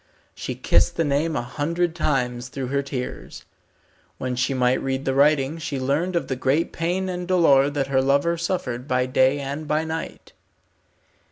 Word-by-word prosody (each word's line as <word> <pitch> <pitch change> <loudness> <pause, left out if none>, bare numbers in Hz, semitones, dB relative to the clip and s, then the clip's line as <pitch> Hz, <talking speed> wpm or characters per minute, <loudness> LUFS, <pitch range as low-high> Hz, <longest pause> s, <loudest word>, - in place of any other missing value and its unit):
She - - -5
kissed - - +2
the 165 - +1
name 150 +2 0
a - - -1
hundred 160 +6 -1
times 125 -6 -1
through 130 -1 -5
her 140 +1 +1
tears. 135 -2 -6 0.7
When 130 -1 -3
she 125 +3 0
might 125 -1 +2
read 135 0 -2
the 135 - +1
writing 145 +2 +3
she 145 -3 -3
learned 150 +8 0
of 170 - 0
the 130 - -2
great 135 +6 0
pain 180 +3 -1
and 180 -1 -4
dolour 145 -7 +4
that 145 -1 -1
her 135 -1 +2
lover 140 +5 +2
suffered 155 -8 -3
by 125 -2 +1
day 130 +2 +3
and 140 +2 -5
by 155 +1 +1
night. 160 0 -6
140 Hz, 175 wpm, -23 LUFS, 130-165 Hz, 0.7 s, dolour